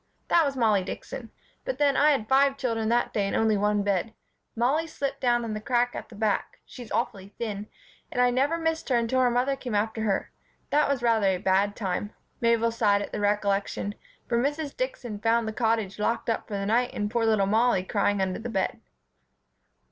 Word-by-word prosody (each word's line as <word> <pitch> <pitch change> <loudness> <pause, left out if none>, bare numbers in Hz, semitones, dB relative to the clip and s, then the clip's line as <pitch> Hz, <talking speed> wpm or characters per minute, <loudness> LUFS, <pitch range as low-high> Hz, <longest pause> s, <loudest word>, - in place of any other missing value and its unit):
"That 335 -2 +5
was 275 -1 -3
Mollie 215 -5 +3
Dixon. - - -7 0.3
But - - -3
then, 285 -1 +3
I 300 - +5
had 270 -8 +1
five 275 +1 +4
children 225 -4 -1
that 240 +1 +1
day 200 -2 +1
and - - -2
only 220 -1 +3
one 205 0 +1
bed. 200 +2 -1 0.4
Mollie 275 +8 +1
slipped 280 -3 -4
down 240 -2 +2
in 220 - -3
the 215 - -4
crack 245 +1 +1
at - - -7
the 230 - -12
back 210 0 -1
she's 245 -4 -11
awfully 195 +1 -3
thin 210 -3 -4 0.4
and - - -3
I 250 0 +4
never 275 +6 +1
missed 325 -2 -2
her 255 - +3
until 235 +2 +1
her 250 - +4
mother 250 +3 +1
came 250 -5 -5
after 220 +2 0
her. 205 -3 -1 0.4
That 295 -1 +3
was 270 -4 0
rather 225 -4 +3
a 190 -1 +2
bad 195 +2 +1
time 205 0 -3 0.3
[Mabel 230 -1 +2
sighed 205 -3 +2
at - - -8
the - - -3
recollection] 205 0 0 0.3
for 235 -1 +1
Mrs. 290 +3 -2
Dixon 275 - -4
found 230 +1 +2
the 220 - -3
Cottage 220 -4 0
locked 230 +2 0
up - - -3
for 210 - -4
the 195 - -2
night 240 +4 +1
and 205 0 -2
poor 235 -1 +1
little 215 -3 +3
Mollie 220 -1 +2
crying 205 +1 0
under 185 +1 -1
the 235 +2 -5
bed." 195 -4 -2
230 Hz, 210 wpm, -27 LUFS, 205-250 Hz, 0.4 s, That